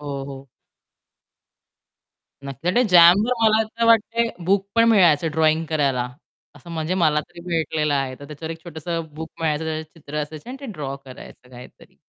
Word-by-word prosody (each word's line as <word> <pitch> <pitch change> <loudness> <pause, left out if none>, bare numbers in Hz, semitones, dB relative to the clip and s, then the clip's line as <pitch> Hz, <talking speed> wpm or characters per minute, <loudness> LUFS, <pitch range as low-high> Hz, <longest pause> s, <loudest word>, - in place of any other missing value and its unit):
हो, 140 -2 -5
हो. 135 -1 -10 2.0
नक्की. 170 - 0
जॅमवर 180 +6 +6
मला 220 0 +4
असं 230 +1 -2
वाटत 230 -2 +2
बुक 195 +2 +1
पण 230 0 +5
मिळायचं 170 -7 +4
ड्रॉइंग 160 +1 +2
करायला, 140 -6 0 0.5
असं 155 +5 -13
म्हणजे 160 +2 -2
मला 155 -5 +2
तरी 170 - -13
भेटलेलं 155 -2 0
आहे 135 -2 -1
तर - - -9
त्याच्यावर 155 +2 -7
एक 165 0 -13
छोटंस 160 -2 -9 0.3
बुक 160 +1 -7
मिळायचं 160 0 -1
चित्र 155 -2 -11
असायची 155 +7 -9
आणि 260 - -6
ते 275 - -7
ड्रॉ 145 -6 -5
करायचं 125 -1 -13
काहीतरी. 125 0 -14
160 Hz, 155 wpm, -22 LUFS, 145-185 Hz, 2.0 s, जॅमवर